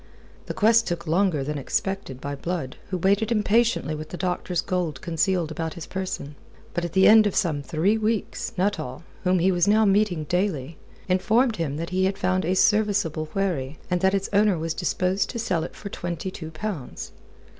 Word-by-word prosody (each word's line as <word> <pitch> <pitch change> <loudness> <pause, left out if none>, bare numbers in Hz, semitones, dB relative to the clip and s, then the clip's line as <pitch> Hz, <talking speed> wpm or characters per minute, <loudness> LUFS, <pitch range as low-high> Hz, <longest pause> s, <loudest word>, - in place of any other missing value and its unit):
The - - -4
quest 225 +2 +4
took 175 -1 -3
longer 170 -3 +1
than 150 +2 -3
was - - -4
expected 190 -4 -2
by 140 +1 -4
Blood, 155 -2 -4
who 185 - -1
waited 200 +5 +2
impatiently 220 -5 +2
with 155 0 -6
the 180 - -6
doctor's 180 -1 -1
gold 175 -7 -2
concealed 170 0 0
about 160 +1 -4
his 170 - -7
person. 185 -6 -4 0.4
But 175 - -1
at 170 - -4
the 190 0 +6
end 215 -1 +7
of 200 - -3
some 155 -4 +1
three 175 +9 +1
weeks, 220 0 -1
Nuttall 180 -8 -1 0.2
whom 185 0 +3
he 180 +2 +3
was 175 +1 +2
now 215 +1 +5
meeting 195 -5 +2
daily 165 -3 -2 0.3
informed 220 +6 +2
him 150 -4 -2
that 165 +2 -4
he 185 +1 +2
had 195 +1 0
found 185 -2 0
a 180 +3 +1
serviceable 200 -7 +2
wherry, 160 -8 -1
and 180 -1 +1
that 190 +1 +3
its 195 0 -1
owner 205 -2 +4
was 160 0 -2
disposed 185 +2 0
to 240 - -5
sell 185 -8 0
it - - -7
for 200 - -7
twenty 175 0 -4
two 160 -3 -7
pounds. 160 -3 -6
180 Hz, 195 wpm, -25 LUFS, 160-200 Hz, 0.4 s, end